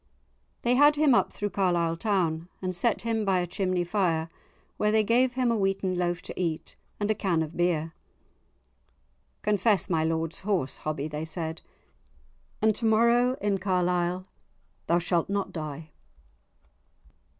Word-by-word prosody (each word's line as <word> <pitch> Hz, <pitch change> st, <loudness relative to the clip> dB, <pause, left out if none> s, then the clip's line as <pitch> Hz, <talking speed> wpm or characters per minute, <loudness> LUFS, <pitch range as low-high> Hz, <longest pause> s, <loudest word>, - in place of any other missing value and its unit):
They 240 Hz, -, +3 dB
had 290 Hz, +3 st, +6 dB
him 295 Hz, -3 st, +4 dB
up -, -, +3 dB
through 205 Hz, -1 st, -4 dB
Carlisle 175 Hz, -3 st, +1 dB
town, 175 Hz, -4 st, 0 dB
and 185 Hz, -1 st, -3 dB
set 225 Hz, +6 st, +1 dB
him 225 Hz, -1 st, 0 dB
by 190 Hz, -2 st, +2 dB
a 175 Hz, -, 0 dB
chimney 185 Hz, 0 st, -1 dB
fire, 170 Hz, -3 st, 0 dB, 0.5 s
where 210 Hz, 0 st, +2 dB
they 220 Hz, 0 st, +3 dB
gave 245 Hz, +4 st, +3 dB
him 250 Hz, -2 st, +1 dB
a -, -, +1 dB
wheaten 195 Hz, -2 st, 0 dB
loaf 175 Hz, 0 st, -1 dB
to -, -, -6 dB
eat, 165 Hz, -2 st, -3 dB, 0.2 s
and 210 Hz, +1 st, +1 dB
a -, -, +4 dB
can 180 Hz, -6 st, 0 dB
of 160 Hz, +1 st, -8 dB
beer. 165 Hz, -2 st, 0 dB, 1.5 s
"Confess 210 Hz, -1 st, +2 dB
my 160 Hz, -2 st, +2 dB
lord's 165 Hz, 0 st, -1 dB
horse, 190 Hz, -10 st, -1 dB
Hobbie," 155 Hz, -1 st, -3 dB
they 150 Hz, 0 st, -5 dB
said, 160 Hz, 0 st, -5 dB, 1.0 s
"and 215 Hz, -1 st, +4 dB
to 235 Hz, -, -3 dB
morrow 235 Hz, +3 st, +4 dB
in 200 Hz, -1 st, 0 dB
Carlisle 180 Hz, -1 st, 0 dB, 0.6 s
thou 170 Hz, -, +3 dB
shalt 175 Hz, 0 st, 0 dB
not 200 Hz, 0 st, -1 dB
die." 155 Hz, -1 st, -6 dB
185 Hz, 150 wpm, -27 LUFS, 165-210 Hz, 1.5 s, had